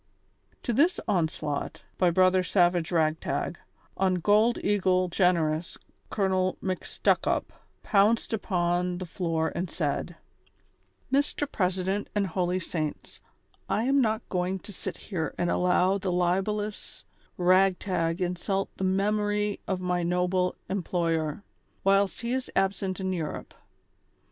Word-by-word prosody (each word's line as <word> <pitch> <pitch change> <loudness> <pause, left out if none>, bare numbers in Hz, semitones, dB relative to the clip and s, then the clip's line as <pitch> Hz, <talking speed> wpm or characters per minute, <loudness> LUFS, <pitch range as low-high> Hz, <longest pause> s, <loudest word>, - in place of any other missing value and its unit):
To 240 - -1
this 325 +10 +3
onslaught, 155 -5 -1 0.2
by 180 - +4
Brother 185 +1 +4
Savage 175 -2 +2
Ragtag, 160 +1 0 0.4
on 190 -1 +2
Gold 210 +6 +3
eagle 185 -3 +2
Generous, 170 -3 +1 0.3
Colonel 190 -2 +1
]SIcStuckup 185 -1 0 0.4
pounced 215 +3 +3
upon 180 -3 0
the 185 - -5
floor 165 -2 -1
and 175 +1 -3
said: 160 +2 -2 0.5
" - - -21
Mr. 285 +1 +1
President 190 +1 -1
and 205 -1 +2
holy 180 0 -1
saints, 155 -4 -4 0.5
I 205 +3 +1
am 275 +2 +3
not 220 -2 0
going 180 +1 -1
to 205 - -7
sit - - -5
here 165 -6 -4
and 175 - 0
allow 180 +2 +2
the 190 -1 -2
libellous 195 +4 -1 0.3
Ragtag 185 -1 +2
insult 180 +2 -1
the - - -3
memory 205 +2 +1
of 185 -1 -2
my 180 -1 0
noble 180 +1 +1
employer, 165 -3 -1 0.4
wliilst 195 0 +3
he 235 +1 -2
is 260 0 -2
absent 195 -1 0
in 190 -1 -1
Europe. 160 -4 -5
185 Hz, 125 wpm, -27 LUFS, 175-200 Hz, 0.5 s, by